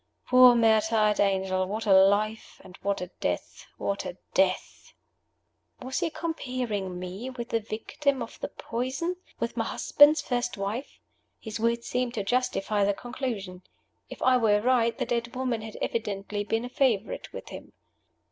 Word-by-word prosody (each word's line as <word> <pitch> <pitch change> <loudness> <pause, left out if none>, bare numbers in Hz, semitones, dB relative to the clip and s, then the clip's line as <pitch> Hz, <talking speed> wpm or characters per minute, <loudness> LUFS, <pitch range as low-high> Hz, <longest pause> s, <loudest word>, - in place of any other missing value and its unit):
Poor 255 -1 +8
martyred 220 -2 +3
angel! 190 -1 +1
What 215 +3 -3
a 200 - +5
life! 205 +3 +3
And 185 -1 -13
what 200 -1 -1
a 180 0 -6
death! - - -3
what 200 0 -2
a 180 - -6 0.2
death!" 190 -1 0 0.9
Was 260 +1 -3
he 345 -2 0
comparing 250 - -3
me 185 +7 -6
with 240 -2 -7
the 230 - +1
victim 245 +5 -2
of 230 - -11
the - - -3
poison 260 +10 -3 0.2
with - - -2
my - - 0
husband's 290 +1 +5
first 245 -2 -2
wife? 205 +7 -4 0.4
His 220 0 -6
words 235 +1 0
seemed 250 0 -1
to 210 - -1
justify 210 -3 0
the 200 0 +2
conclusion. 225 -8 -5 0.5
If - - -7
I 255 0 +5
were 215 -3 +3
right, 235 0 +2
the 255 - -1
dead 235 0 -2
woman 250 -3 -1
had 220 -1 -8
evidently 205 -2 -2
been 225 +3 -1
a - - -6
favorite 250 -7 0
with - - -8
him. - - -10
225 Hz, 160 wpm, -27 LUFS, 200-250 Hz, 0.9 s, Poor